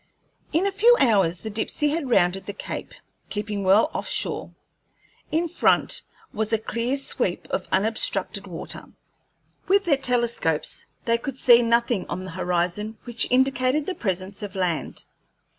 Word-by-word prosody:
In 335 +5 +2
a 400 - +1
few 460 +5 +5
hours 195 -9 +3
the 220 - -5
Dipsey 225 +7 0
had 295 -3 -2
rounded 190 -4 +2
the 205 - -4
cape, - - -7 0.3
keeping 210 -1 -3
well 205 +10 +4
off - - -4
shore. - - -2 0.8
In 330 +2 +1
front 350 - +2 0.3
was 220 0 -1
a 225 - +4
clear 235 +4 -1
sweep 240 -8 -2
of 185 - -2
unobstructed 220 +4 0
water. - - -5 0.8
With 395 +1 +3
their 295 -5 +3
telescopes 235 - 0 0.2
they 230 0 +2
could 270 +1 -5
see 240 -2 +7
nothing 235 -3 +1
on 185 +2 -4
the 185 - -7
horizon 180 +5 -1
which 235 -1 0
indicated 260 +2 +2
the 380 - -2
presence 190 - -3
of 205 -1 -6
land. 180 -4 -2
225 Hz, 150 wpm, -24 LUFS, 195-265 Hz, 0.8 s, see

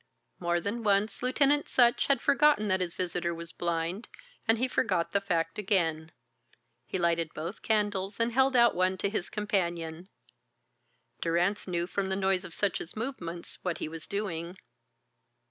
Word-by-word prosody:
More 175 0 +1
than 205 +7 -3
once 205 0 +2
Lieutenant 280 +3 +2
Sutch 240 -2 +4
had 275 -4 +2
forgotten 280 -6 +4
that 185 -1 +2
his 175 -2 -2
visitor 175 -1 -1
was 170 0 -6
blind, 170 +4 -2 0.4
and 225 +1 +4
he 255 +3 +1
forgot 185 -8 0
the 200 - +2
fact 170 -2 -1
again. 165 -6 0 0.8
He - - -2
lighted 170 -2 0
both 165 +6 -5
candles 205 -2 0
and 230 +1 +2
held 265 +2 +3
out 235 -1 +6
one 185 +1 +1
to 200 - -1
his 195 -5 -2
companion. 175 -4 -2 1.1
Durrance 175 +5 +1
knew 175 -1 -1
from 190 +2 -2
the 190 - +1
noise 190 -1 +1
of 165 - -9
Sutch's 195 -4 -2
movements 180 -8 -5
what 175 -3 -2
he - - -3
was 160 0 -8
doing. 185 -3 -4
190 Hz, 160 wpm, -29 LUFS, 170-215 Hz, 1.1 s, out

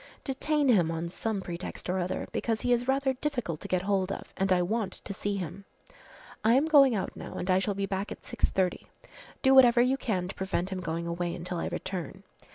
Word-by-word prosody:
Detain 295 +2 0
him 185 -10 +4
on 165 +1 -2
some 210 +2 -2
pretext 175 -1 -6
or 185 +1 0
other 180 0 -2
because 225 -2 -1
he 245 - +2
is 245 +1 0
rather 270 0 +2
difficult 250 - -3
to - - -6
get 185 -1 0
hold 195 -1 +1
of - - -7
and 195 0 0
I 180 -1 +4
want 215 +2 -1
to 200 - -7
see 200 +1 -2
him. 185 +1 -5 0.8
I 225 +2 +5
am 275 +4 +4
going 280 -6 +6
out 195 - -3
now - - -8
and 185 - -1
I 185 - +4
shall 195 +1 -1
be 200 0 -1
back 195 +1 -3
at - - -8
6.30. 185 -2 -1 0.6
Do 265 -1 +6
whatever 250 -3 +7
you 255 +2 +3
can 190 -9 -1
to 190 - -6
prevent 190 -1 -2
him 190 - -3
going 165 -1 -3
away 170 0 -2
until 175 0 -4
I - - -2
return. 185 -5 -5
195 Hz, 220 wpm, -29 LUFS, 180-245 Hz, 0.8 s, whatever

